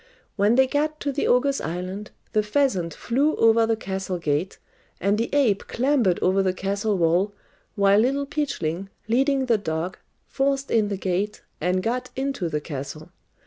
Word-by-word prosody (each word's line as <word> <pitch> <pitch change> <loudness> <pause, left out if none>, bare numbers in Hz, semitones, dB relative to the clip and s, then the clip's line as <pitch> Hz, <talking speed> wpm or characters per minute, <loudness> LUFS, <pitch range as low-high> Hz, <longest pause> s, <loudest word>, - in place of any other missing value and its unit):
When 210 +3 +3
they 265 +1 +6
got 305 +3 -1
to 285 - -1
the 280 - -1
ogres' 275 +3 +2
island, 185 +5 -4 0.2
the 215 - +4
pheasant 210 -6 +1
flew 270 - 0
over 225 0 +4
the 225 - +2
castle 190 -3 -4
gate, 155 +2 -1 0.4
and 200 +1 +2
the 230 +2 -1
ape 255 -9 +2
clambered 245 -8 +2
over 190 +1 +3
the 185 -1 0
castle 200 +2 -1
wall, 175 +4 +2 0.4
while 200 0 +4
Little 275 +5 +1
Peachling, 195 - -2 0.2
leading 270 +3 +2
the 230 -4 +2
dog, 165 0 -3 0.3
forced 275 0 -1
in 220 -2 +3
the 200 -1 -3
gate, 195 +3 -2 0.2
and 180 +3 +1
got 250 +2 -2
into 265 -10 -2
the 150 -1 -1
castle. 145 +1 -7
210 Hz, 165 wpm, -24 LUFS, 185-265 Hz, 0.4 s, they